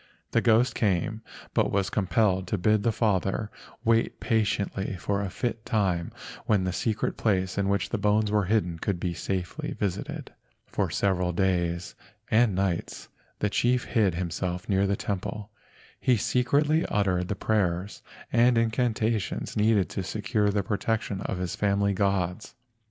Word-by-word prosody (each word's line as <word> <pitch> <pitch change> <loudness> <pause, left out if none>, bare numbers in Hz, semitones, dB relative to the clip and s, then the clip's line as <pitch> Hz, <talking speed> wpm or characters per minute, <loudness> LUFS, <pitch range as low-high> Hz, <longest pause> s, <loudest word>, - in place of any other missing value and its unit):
The 115 - +3
ghost 115 +2 +4
came, 105 +1 0 0.3
but - - +2
was 100 -1 0
com¬ 95 -4 -1
pelled 95 -1 +2
to 105 - -1
bid 105 +3 +3
the 115 - +2
father 105 -1 0 0.3
wait 115 0 +2
patiently 100 -3 0
for 100 +2 -1
a 100 - -2
fit 115 +2 -3
time 95 -7 0 0.4
when 100 -3 +3
the 90 -1 -1
secret 110 +2 -1
place 95 -4 +1
in 100 -1 0
which 100 0 0
the - - -2
bones 105 0 +2
were 105 -2 +2
hidden 90 -5 0
could 95 -1 -2
be 90 0 -2
safely 90 0 -3
visited. 100 -1 -3 0.3
For - - -1
several 90 -3 0
days 85 -1 0 0.4
and 110 -3 +4
nights 95 -3 -2 0.3
the 105 - 0
chief 125 +2 +2
hid 105 -7 +1
him¬ 85 -1 -2
self 90 +1 -3
near 100 -1 +2
the 100 - +1
temple. 100 +2 -4 0.5
He 125 -3 +3
secretly 145 - +2
uttered 90 -3 +1
the 105 - -2
prayers 95 -2 -1 0.3
and 120 +1 +5
incantations 115 -2 0
needed 105 -2 +3
to - - -3
secure 105 +2 0
the 100 0 0
protection 105 0 -1
of 95 - -3
his 90 -1 -3
family 100 0 +1
gods. 95 0 -1
100 Hz, 155 wpm, -27 LUFS, 95-110 Hz, 0.5 s, and